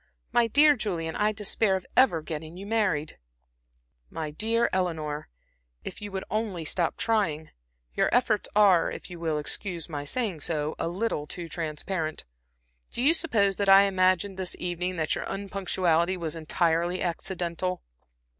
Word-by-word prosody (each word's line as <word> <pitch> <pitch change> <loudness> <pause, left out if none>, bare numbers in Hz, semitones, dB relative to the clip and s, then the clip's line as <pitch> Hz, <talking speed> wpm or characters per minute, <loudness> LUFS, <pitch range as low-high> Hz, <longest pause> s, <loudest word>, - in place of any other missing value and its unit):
My 235 -1 +3
dear 290 +5 +6
Julian, 170 -8 -3
I 210 +1 +2
despair 210 -1 +1
of 185 - -4
ever 175 -12 +4
getting 160 +2 -6
you 195 - -8
married." 200 -9 0 0.9
"My 155 -2 -5
dear 225 +8 +1
Eleanor, 160 -5 -2 0.5
if - - -7
you 205 -1 -6
would 190 0 -3
only 200 -5 -2
stop 170 +2 0
trying. 185 -9 0 0.4
Your - - +2
efforts 230 -4 +2
are, 195 -5 +5
if - - -8
you 175 - -8
will 160 -2 -1
excuse 170 +2 -3
my 145 -3 -5
saying 195 - -2
so, 150 -1 -1
a - - -1
little 175 -4 -2
too 170 +1 -6
transparent. 160 0 -3 0.6
Do 240 - -3
you 300 +4 +6
suppose 215 - +2
that 200 -1 +1
I 195 +1 +9
imagined 185 0 +2
this 185 -1 -2
evening 180 +1 -2
that 155 -3 0
your - - -3
unpunctuality 185 -3 0
was 165 -2 -3
entirely 170 +2 0
accidental?" 180 +1 -3
180 Hz, 155 wpm, -27 LUFS, 165-205 Hz, 0.9 s, I